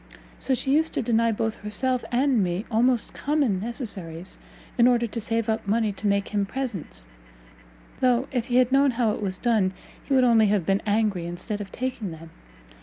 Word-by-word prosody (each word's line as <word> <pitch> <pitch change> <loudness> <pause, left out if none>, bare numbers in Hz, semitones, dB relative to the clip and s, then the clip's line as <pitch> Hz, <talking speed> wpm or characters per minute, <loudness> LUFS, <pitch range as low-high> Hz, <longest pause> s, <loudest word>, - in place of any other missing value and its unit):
So 265 - +1
she 265 - -1
used 320 +2 +2
to - - 0
deny 230 0 +2
both 225 +1 -2
herself 250 +5 -1
and 250 -3 +2
me 180 +4 -2
almost 240 +1 +2
common 280 -10 0
necessaries, 190 - -5 0.4
in 240 -1 +5
order 240 -1 +3
to 230 +1 -4
save 225 +1 -1
up 220 -1 -1
money 220 +1 +1
to 205 +2 -4
make 200 0 +1
him 205 -1 0
presents: 195 - -4 0.9
though, 250 0 +2
if 250 -2 -1
he 245 - -1
had 255 0 +4
known 275 +1 +5
how 235 -4 +2
it 210 - -4
was 190 -2 -2
done, 215 -5 +1 0.3
he 275 - 0
would 260 - +5
only 230 -3 +5
have 200 -4 +1
been 195 +2 +1
angry 205 -5 +1
instead 180 +5 -4
of 195 - -8
taking 250 -5 -3
them. 165 0 -10
225 Hz, 190 wpm, -25 LUFS, 200-250 Hz, 0.9 s, in